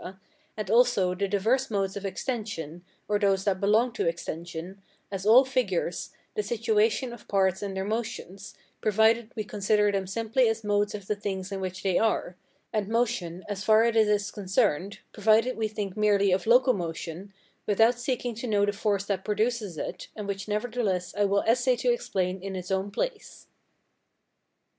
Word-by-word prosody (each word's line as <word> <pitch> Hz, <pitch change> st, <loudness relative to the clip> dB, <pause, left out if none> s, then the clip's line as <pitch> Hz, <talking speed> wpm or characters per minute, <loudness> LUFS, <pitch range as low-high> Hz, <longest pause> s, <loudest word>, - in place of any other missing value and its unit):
and 210 Hz, -2 st, -3 dB
also 230 Hz, -6 st, +4 dB
the 200 Hz, +2 st, -1 dB
diverse 225 Hz, +7 st, +1 dB
modes 195 Hz, -2 st, -1 dB
of 200 Hz, 0 st, -3 dB
extension, 190 Hz, -, -4 dB, 0.2 s
or 205 Hz, 0 st, +1 dB
those 195 Hz, -2 st, +2 dB
that 195 Hz, -2 st, 0 dB
belong 220 Hz, +5 st, +3 dB
to 225 Hz, -, -2 dB
extension, 170 Hz, +2 st, -5 dB, 0.3 s
as 195 Hz, 0 st, -4 dB
all 250 Hz, +5 st, +8 dB
figures, 205 Hz, -10 st, -1 dB, 0.2 s
the -, -, 0 dB
situation 220 Hz, +2 st, +1 dB
of 240 Hz, -, -13 dB
parts 190 Hz, -2 st, +1 dB
and 195 Hz, -2 st, -4 dB
their 190 Hz, -, -2 dB
motions, 205 Hz, -3 st, -5 dB, 0.3 s
provided 220 Hz, +2 st, +3 dB
we 215 Hz, -, -2 dB
consider 210 Hz, 0 st, +1 dB
them 195 Hz, -2 st, -2 dB
simply 225 Hz, +4 st, +1 dB
as 225 Hz, 0 st, -2 dB
modes 205 Hz, 0 st, +1 dB
of 200 Hz, -2 st, -8 dB
the 210 Hz, -, -1 dB
things 195 Hz, -1 st, -4 dB
in 195 Hz, -1 st, -4 dB
which 185 Hz, 0 st, -5 dB
they 190 Hz, -2 st, +2 dB
are; 220 Hz, -5 st, 0 dB, 0.4 s
and 210 Hz, -3 st, 0 dB
motion 215 Hz, -7 st, -1 dB
as 205 Hz, -1 st, -4 dB
far 220 Hz, +1 st, +5 dB
as 230 Hz, 0 st, +1 dB
it 220 Hz, -1 st, +5 dB
is 205 Hz, -2 st, +1 dB
concerned, 195 Hz, -2 st, 0 dB
provided 220 Hz, +4 st, +3 dB
we 220 Hz, -1 st, -1 dB
think 205 Hz, -3 st, -5 dB
merely 205 Hz, -2 st, +3 dB
of 185 Hz, +3 st, 0 dB
locomotion, 195 Hz, -7 st, +1 dB, 0.4 s
without 225 Hz, +4 st, +3 dB
seeking 245 Hz, -1 st, -2 dB
to 235 Hz, +3 st, -6 dB
know 205 Hz, -2 st, +3 dB
the 205 Hz, -, -1 dB
force 200 Hz, -1 st, 0 dB
that 195 Hz, -2 st, -2 dB
produces 215 Hz, -4 st, -1 dB
it, 175 Hz, +4 st, -5 dB
and 210 Hz, -2 st, -6 dB
which 195 Hz, 0 st, -4 dB
nevertheless 210 Hz, -4 st, -1 dB
I 205 Hz, 0 st, +2 dB
will 200 Hz, 0 st, +2 dB
essay 245 Hz, +2 st, +3 dB
to 245 Hz, 0 st, +1 dB
explain 185 Hz, -5 st, -2 dB
in 195 Hz, 0 st, -5 dB
its 180 Hz, 0 st, -6 dB
own 190 Hz, +1 st, 0 dB
place. 435 Hz, -, -4 dB
205 Hz, 175 wpm, -27 LUFS, 190-225 Hz, 0.4 s, all